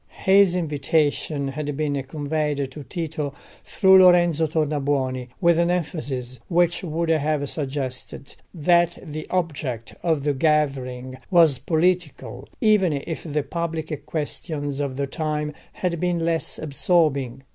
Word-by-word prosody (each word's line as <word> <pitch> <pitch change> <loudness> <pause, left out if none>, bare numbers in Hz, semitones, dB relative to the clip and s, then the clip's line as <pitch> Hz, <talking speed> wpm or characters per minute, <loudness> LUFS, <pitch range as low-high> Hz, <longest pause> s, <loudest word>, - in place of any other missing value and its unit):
His 190 -1 +5
invitation 150 -2 0
had 145 0 -4
been 145 -2 -1
conveyed 145 0 -2
to 150 +2 -9
Tito 150 0 -4 0.3
through 190 -1 +5
Lorenzo 175 -3 +5
Tornabuoni, 140 -4 -1
with 170 -3 +4
an 170 0 +2
emphasis 140 -8 -3
which 175 0 +2
would 165 0 -2
have 155 -2 +1
suggested 135 -2 -4 0.2
that 170 +1 +2
the 155 -2 -7
object 145 -10 -3
of 160 -5 0
the 145 0 +1
gathering 130 -4 0
was 165 -7 +5
political, 150 -5 -1
even 210 -6 +4
if 145 +3 -4
the 150 -2 -2
public 160 -2 -4
questions 145 -2 -3
of 140 -2 -2
the 140 - 0
time 150 +1 -3 0.2
had 175 -3 -2
been 175 -1 0
less 165 -2 0
absorbing. 140 -4 0
150 Hz, 125 wpm, -23 LUFS, 140-170 Hz, 0.3 s, His